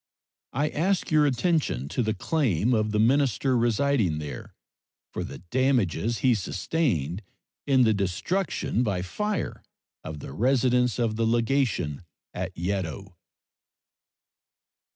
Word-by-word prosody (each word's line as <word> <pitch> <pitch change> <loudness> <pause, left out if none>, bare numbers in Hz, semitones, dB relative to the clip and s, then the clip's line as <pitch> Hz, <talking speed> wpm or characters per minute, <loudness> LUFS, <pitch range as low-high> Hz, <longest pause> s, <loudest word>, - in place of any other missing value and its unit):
I 145 +4 +1
ask 180 +5 0
your 150 -1 +5
attention 140 - 0
to 125 - -1
the 110 -1 0
claim 125 - +1
of 110 -2 +1
the 105 - -1
minister 130 +2 +2
residing 120 - +2
there 75 -2 -7 0.6
for - - -3
the - - -7
damages 120 - +1
he 125 - +6
sustained 95 - -1 0.5
in 130 -2 +5
the 110 -2 +4
destruction 105 - -1
by 100 -7 0
fire 210 - -3 0.4
of 80 -1 -6
the 70 - -8
residence 125 - +2
of 115 -3 0
the 115 0 +1
legation 115 - 0 0.3
at - - -4
Yedo. 95 +1 -3
115 Hz, 120 wpm, -26 LUFS, 95-135 Hz, 0.6 s, he